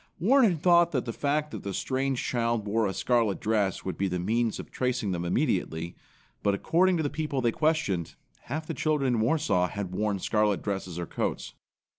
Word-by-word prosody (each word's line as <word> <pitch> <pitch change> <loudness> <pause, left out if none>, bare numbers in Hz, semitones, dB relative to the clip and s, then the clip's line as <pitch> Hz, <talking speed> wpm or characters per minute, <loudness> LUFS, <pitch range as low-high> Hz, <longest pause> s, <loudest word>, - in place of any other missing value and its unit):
Warren 235 - +5
had 170 -3 -3
thought 170 -1 +5
that 130 -3 0
the 115 - -4
fact 150 +3 -1
that - - -6
the 100 -2 -4
strange 135 -1 -1
child 115 -3 0
wore 110 +1 +1
a - - -1
scarlet 115 -5 +1
dress 105 -3 0
would 95 -4 -4
be 100 - +1
the 90 -1 -2
means 110 +5 0
of - - -9
tracing 125 -5 -1
them 85 -1 -2
immediately; 85 -1 -1 0.5
but 100 -1 +2
according 180 - +2
to 160 - 0
the 145 - 0
people 150 -2 -2
they 120 -2 +2
questioned, 150 - 0 0.3
half 155 +5 -4
the - - -4
children 145 -5 +1
in 115 - +1
Warsaw 110 - +2
had 100 -2 -5
worn 105 +1 0
scarlet 105 +1 +1
dresses 95 -4 -3
or 85 - -3
coats. - - -3
115 Hz, 200 wpm, -28 LUFS, 100-150 Hz, 0.5 s, Warren